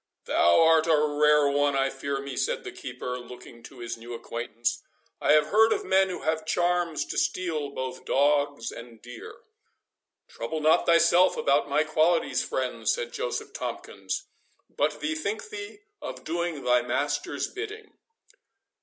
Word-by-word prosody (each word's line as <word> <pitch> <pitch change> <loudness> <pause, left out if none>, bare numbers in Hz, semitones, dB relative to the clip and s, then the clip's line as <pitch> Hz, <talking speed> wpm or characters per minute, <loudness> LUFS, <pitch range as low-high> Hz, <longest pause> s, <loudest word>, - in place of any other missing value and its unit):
"Thou 85 - +4
art 160 0 +4
a 160 -2 +5
rare 150 0 +3
one, 145 0 +2
I 135 0 +1
fear 140 0 -3
me," 140 -1 -6
said - - -1
the - - -6
keeper, 125 0 -6
looking 120 -1 -12
to 135 - -13
his 120 0 -5
new 120 +1 -8
acquaintance. 120 +1 -3 0.4
"I - - +4
have 150 0 +4
heard 220 +1 +5
of - - 0
men 190 0 +3
who 180 - -5
have 160 0 0
charms 175 -1 0
to - - -2
steal 160 -6 -1
both 130 -2 -6
dogs 145 -2 +1
and 115 -1 -11
deer." 120 0 -11 0.8
"Trouble 115 +7 -5
not 155 +1 +3
thyself 170 +2 +5
about 140 +1 +2
my 150 +2 +3
qualities, 160 +2 +2
friend," - - -2
said 485 0 -1
Joseph - - -4
Tomkins, 390 - -5 0.5
"but - - 0
bethink 320 +9 -3
thee 410 -1 -8 0.2
of - - -7
doing 170 -2 -3
thy 125 0 +3
master's 140 +4 -2
bidding." 425 +2 -8
150 Hz, 155 wpm, -27 LUFS, 130-175 Hz, 0.8 s, a